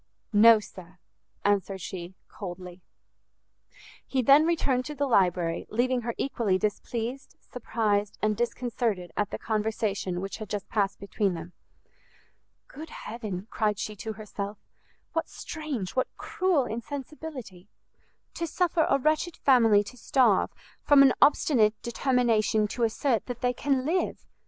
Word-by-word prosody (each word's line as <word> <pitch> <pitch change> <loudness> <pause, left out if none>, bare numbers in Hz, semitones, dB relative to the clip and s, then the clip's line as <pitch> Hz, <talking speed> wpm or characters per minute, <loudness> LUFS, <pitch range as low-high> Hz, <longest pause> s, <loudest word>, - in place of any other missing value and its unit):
"No, 220 +2 +8
sir," 185 -3 -12 0.5
answered 200 -1 +1
she, 180 0 -7
coldly. 180 -2 -8 1.3
He 260 -2 0
then 280 +6 +6
returned 275 -7 +1
to 300 - -6
the 285 +1 0
library, 180 -8 +1
leaving 245 +2 +1
her 235 0 -4
equally 225 -8 0
displeased, 230 +5 -3
surprised, 210 -4 -1
and 215 0 +1
disconcerted 235 -5 -2
at 205 - 0
the - - -4
conversation 210 -4 -1
which 195 +1 -5
had 215 -3 -8
just 205 -1 -4
passed 200 -3 0
between 200 -1 -1
them. 170 +2 -8 1.1
"Good 310 +3 -10
heaven," 210 -8 -6
cried 210 -3 0
she 210 +1 -4
to 220 +2 -5
herself, 205 -1 -6 0.6
"what 325 - -1
strange, 290 - -5
what 260 - +1
cruel 360 -8 +1
insensibility! 255 - -7 0.7
to 335 - -3
suffer 340 0 +1
a 275 - +4
wretched 310 +4 0
family 225 -6 +5
to 250 +5 -11
starve, 235 -4 +3 0.3
from 285 -1 +6
an 265 -2 +6
obstinate 225 -7 +4
determination 235 -4 +2
to 240 - -5
assert 230 0 +1
that 245 -2 -6
they 250 0 +1
can 265 0 0
live! 350 +4 -1
225 Hz, 135 wpm, -27 LUFS, 200-265 Hz, 1.3 s, No